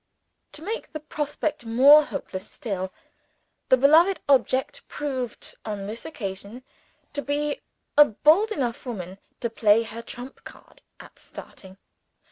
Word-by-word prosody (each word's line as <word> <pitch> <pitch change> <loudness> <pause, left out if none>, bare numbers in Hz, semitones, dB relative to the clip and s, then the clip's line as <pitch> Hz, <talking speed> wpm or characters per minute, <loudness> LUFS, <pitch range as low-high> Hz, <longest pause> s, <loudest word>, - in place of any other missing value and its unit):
To 305 - -7
make 440 +6 -5
the 310 - -4
prospect 300 0 -3
more 270 +7 +7
hopeless 190 -11 -6
still, 190 -5 -4 0.8
the 260 - +6
beloved 320 +8 +5
object 270 - +2
proved, 260 -5 -5
on 205 -2 -5
this 220 +3 -7
occasion, 205 -2 -6 0.5
to 290 - -2
be 290 +1 -2 0.3
a 295 0 +9
bold 315 - +3
enough 255 - -3
woman 190 -5 -6 0.2
to 235 - -1
play 220 0 +4
her 230 +1 -7
trump 245 +3 -9
card - - -15 0.2
at - - -14
starting. 190 0 -12
260 Hz, 130 wpm, -25 LUFS, 220-295 Hz, 0.8 s, a